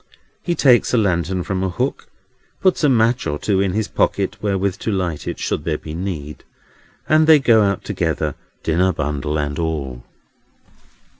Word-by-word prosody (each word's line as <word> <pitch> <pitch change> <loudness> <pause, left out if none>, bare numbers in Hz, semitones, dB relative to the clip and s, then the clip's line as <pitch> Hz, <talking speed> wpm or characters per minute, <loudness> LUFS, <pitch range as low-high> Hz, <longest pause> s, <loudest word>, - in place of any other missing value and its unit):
He 175 - -1
takes 125 -4 +4
a - - +3
lantern 90 -3 0
from 95 0 -2
a 95 - 0
hook, 90 - -3 0.5
puts 185 -3 +2
a 145 - +5
match 120 -1 +2
or 75 - -1
two 95 +4 0
in 95 -2 0
his 110 +1 -1
pocket - - 0
wherewith 100 -2 -1
to 110 - -2
light 90 -6 -2
it, - - -3
should - - -2
there 80 -1 -1
be 75 - -9
need; 80 -4 -5 0.6
and 155 0 +4
they 160 -1 +8
go 115 -5 +4
out 100 -2 0
together, - - -1 0.3
dinner 90 +3 +2
bundle 75 0 -2
and 75 0 -2
all. 70 -7 -3
95 Hz, 170 wpm, -20 LUFS, 80-110 Hz, 0.6 s, they